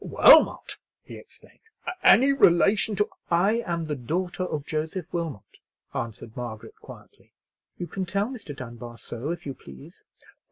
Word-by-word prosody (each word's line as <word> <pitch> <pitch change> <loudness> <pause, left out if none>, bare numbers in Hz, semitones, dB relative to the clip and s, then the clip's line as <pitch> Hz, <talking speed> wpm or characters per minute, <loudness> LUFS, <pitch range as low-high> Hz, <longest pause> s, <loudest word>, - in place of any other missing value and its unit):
"Wilmot!" - - +5 0.3
he - - -12
exclaimed; - - -18 0.4
"any 275 +3 +6
relation 205 -2 +4
to——" 210 - +1 0.2
"I 195 +7 +2
am 170 -1 -2
the 155 - -3
daughter 175 +9 -3
of 150 -5 -4
Joseph 160 +3 -4
Wilmot," 165 - -5 0.3
answered 115 -1 -6
Margaret, 115 -3 -7
quietly. - - -15 0.4
"You 175 - -4
can 185 +1 -5
tell 200 +2 0
Mr. 220 - -8
Dunbar 120 -2 -9
so 120 +6 -7
if 170 +1 -5
you 140 - -4
please." 65 - -14
165 Hz, 145 wpm, -25 LUFS, 125-185 Hz, 0.4 s, any